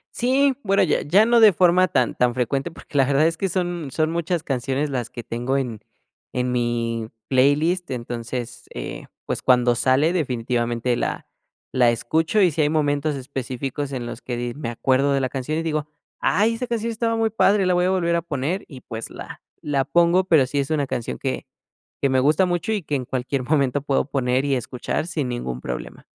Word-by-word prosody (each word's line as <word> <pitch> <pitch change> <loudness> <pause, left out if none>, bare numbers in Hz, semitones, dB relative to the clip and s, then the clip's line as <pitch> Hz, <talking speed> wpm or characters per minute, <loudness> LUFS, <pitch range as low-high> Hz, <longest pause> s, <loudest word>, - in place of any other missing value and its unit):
Sí, 270 +3 +3
bueno 195 0 +3
ya 180 - +1
ya 190 +9 +4
no 235 +1 +4
de 215 -3 +8
forma 180 +1 +4
tan 130 -7 +1
tan 125 -1 +2
frecuente, 135 +6 -1
porque 155 - -8
la 135 - +5
verdad 140 +3 +3
es 165 0 -2
que 195 - -1
son 175 -4 -2
son 155 +2 0
muchas 170 0 -1
canciones 135 +1 -1
las 125 -4 -3
que 120 -1 -8
tengo 120 +4 -2
en 120 -6 -3 0.5
en 125 0 -1
mi 115 -2 -1 0.2
playlist. 150 +7 +2
Entonces, 120 0 -5
eh, - - -6 0.2
pues, - - -2
cuando 125 -1 +4
sale 135 +7 +2
definitivamente 120 -5 -1
la - - -3 0.4
la 125 -2 +4
escucho, 160 - +1
y 180 -3 +5
si 155 - 0
hay 145 - +3
momentos 150 -1 0
específicos 135 +1 -4
en 125 -3 -4
los 120 0 -7
que 120 -2 -4
di 120 0 -3
me 140 -5 -4
acuerdo 130 +4 +1
de 140 - +2
la 130 - -1
canción 135 +4 -3
y - - -2
digo: 155 -2 -2 0.3
"Ay 220 +4 +2
esa 250 +2 -4
canción 230 -1 -2
estaba 230 0 0
muy 225 0 +1
padre, 205 -2 +3
la 180 - +3
voy 180 0 +2
a - - +2
volver 170 -3 +1
a 170 - +1
poner", 160 +3 -3
y 135 -5 -11
pues 115 -1 -6
la - - -9 0.2
la 140 -2 0
pongo, 175 +4 +3
pero 160 -7 +4
sí 140 +3 -2
es 140 +1 -1
una 145 -3 +1
canción 115 - -3
que - - -3 0.6
que 140 - +2
me 130 0 +3
gusta 155 +7 +3
mucho, 175 +3 -1
y 210 -3 -1
que 150 - -3
en 130 -2 -1
cualquier 130 +1 -2
momento 140 0 +1
puedo 140 -1 +1
poner 130 -1 0
y 140 -1 +1
escuchar 125 +4 -3
sin 150 -7 -2
ningún 65 - -4
problema. 60 -1 -6
140 Hz, 205 wpm, -23 LUFS, 125-170 Hz, 0.6 s, de